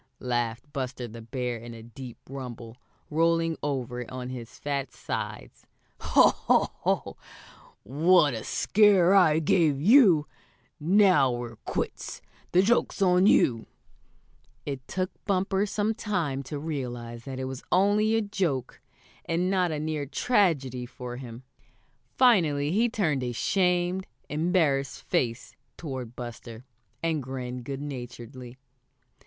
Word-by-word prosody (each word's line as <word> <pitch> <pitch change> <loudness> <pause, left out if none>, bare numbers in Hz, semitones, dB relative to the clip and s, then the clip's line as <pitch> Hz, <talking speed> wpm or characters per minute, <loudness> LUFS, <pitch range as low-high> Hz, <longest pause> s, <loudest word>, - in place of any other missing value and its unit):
laughed 120 -2 -1
Buster 130 -3 -4
the 115 +1 -10
Bear 125 +1 -3
in 115 +1 -9
a 115 - -11
deep 120 +1 -10
rumble, 120 -4 -8 0.4
rolling 165 +1 +2
over 125 -4 -3
on 125 -1 -5
his 125 -1 -8
fat 140 -3 -3
sides. - - -6 0.3
"Ho! - - +5
Ho! - - +1
Ho! - - -1 0.7
What 150 - +4
a 110 - -5
scare 195 -3 +4
I 170 -6 +5
gave 160 -2 +2
you! 185 - +6 0.5
Now 180 -5 +4
we're 120 -2 -5
quits. - - -4 0.3
The 180 +1 +5
joke's 235 +2 +1
on 185 0 +4
you!" 115 - +3 1.0
It 135 -3 -5
took 185 0 -2
Bumper 195 0 +1
some 210 +2 0
time 175 -11 -2
to 145 +3 -5
realize 120 -6 -5
that 135 -1 -6
it 130 - -3
was 130 0 -6
only 205 +4 +3
a 225 - +2
joke, 180 - -2 0.4
and 180 +3 0
not 185 -2 +2
a 150 - -2
near 155 -2 -3
tragedy 140 - +1
for 125 0 -8
him. 120 -1 -9 0.7
Finally 160 - +4
he 225 +6 +2
turned 160 -12 0
a 125 -1 -3
shamed, 180 - +1 0.2
embarrassed 150 -3 0
face 115 -1 -2 0.2
toward 130 -7 -6
Buster, 120 0 -8 0.4
and 160 -2 0
grinned 125 -1 -6
good 140 +1 -5
naturedly. 125 -2 -8
140 Hz, 130 wpm, -27 LUFS, 125-180 Hz, 1.0 s, you